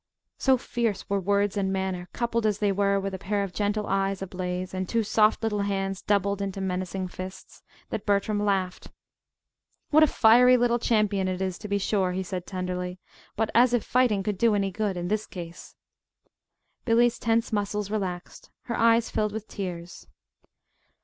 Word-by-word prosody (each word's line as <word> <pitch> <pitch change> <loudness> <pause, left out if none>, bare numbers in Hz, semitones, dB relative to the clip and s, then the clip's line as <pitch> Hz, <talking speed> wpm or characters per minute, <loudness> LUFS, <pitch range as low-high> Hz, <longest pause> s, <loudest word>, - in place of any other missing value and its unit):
So 265 -1 +4
fierce 235 -5 -2
were 200 - +2
words 200 +1 +1
and 195 -1 0
manner, 190 -2 -3
coupled 235 -2 0
as 210 -2 0
they 205 -1 +1
were 200 0 +2
with 195 0 -4
a 190 - -5
pair 200 +1 -1
of 195 -2 -6
gentle 210 +1 -1
eyes 195 0 -1
ablaze 180 0 -4
and 185 -1 -3
two 230 -1 +1
soft 215 +1 +3
little 210 -2 0
hands 195 -1 -2
doubled 200 -1 +1
into 195 -1 -3
menacing 185 0 -3
fists, 185 +1 -9 0.3
that 210 - -3
Bertram 205 +1 +1
laughed. 190 -3 -1 1.0
"What 310 +1 +6
a 310 - +7
fiery 250 +1 +6
little 240 0 +2
champion 210 -4 +1
it 185 -1 -2
is, 190 -2 -3
to - - -7
be 200 0 0
sure," 190 -2 0
he 190 +1 -2
said 180 -1 -5
tenderly. 180 -1 -4 0.4
"But 220 0 -1
as 245 +1 +5
if 235 - 0
fighting 240 -6 +2
could 205 -1 -2
do 230 -2 +4
any 195 -1 0
good 200 -1 -2
in 175 0 -3
this 215 +2 -1
case!" 170 -2 -9 1.1
Billy's 240 +1 +3
tense 230 0 0
muscles 205 0 -1
relaxed. 185 -4 -4
Her 235 - -4
eyes 230 0 +3
filled 210 -1 0
with 220 0 -6
tears. 175 -2 -7
200 Hz, 175 wpm, -26 LUFS, 190-220 Hz, 1.1 s, a